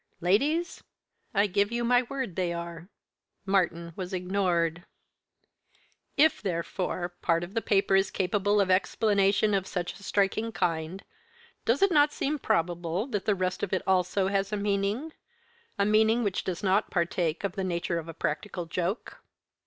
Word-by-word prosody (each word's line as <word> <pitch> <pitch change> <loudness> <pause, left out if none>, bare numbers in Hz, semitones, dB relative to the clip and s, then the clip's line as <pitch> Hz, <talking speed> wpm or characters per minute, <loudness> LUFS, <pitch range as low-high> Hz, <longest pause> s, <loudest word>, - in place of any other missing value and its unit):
Ladies, 285 - +1 0.5
I 200 - +3
give 200 +2 +1
you 235 0 -1
my 245 +1 +4
word 255 -6 -5
they 180 -2 0
are." 170 +1 -7 0.6
Martyn 170 -4 0
was 185 -1 -4
ignored. 180 -3 0 1.3
"If, 315 +2 +4
therefore, 175 0 -2
part 165 0 +2
of 175 +3 -8
the 225 - 0
paper 195 -2 +2
is 195 0 +3
capable 205 +2 +1
of 190 -2 +2
explanation 200 +1 +2
of 190 -1 0
such 175 -2 -3
a - - -15
striking 200 +3 0
kind, 165 +2 -2 0.6
does 245 +10 +2
it 395 - +4
not 295 -2 +5
seem 295 +2 -1
probable 175 0 0
that 205 -5 -2
the 210 -2 +2
rest 185 -1 -2
of 190 - -2
it 185 - 0
also 190 +1 +2
has 195 0 0
a 210 - -1
meaning 205 +9 -1 0.6
a 200 - +2
meaning 220 +3 +3
which 200 -3 -1
does 185 +1 -4
not 195 +2 +2
partake 170 -1 -1
of 200 - 0
the 195 0 -4
nature 170 -1 -1
of 165 - -8
a 165 - -6
practical 170 +3 -3
joke?" 180 +5 -3
195 Hz, 160 wpm, -28 LUFS, 175-210 Hz, 1.3 s, not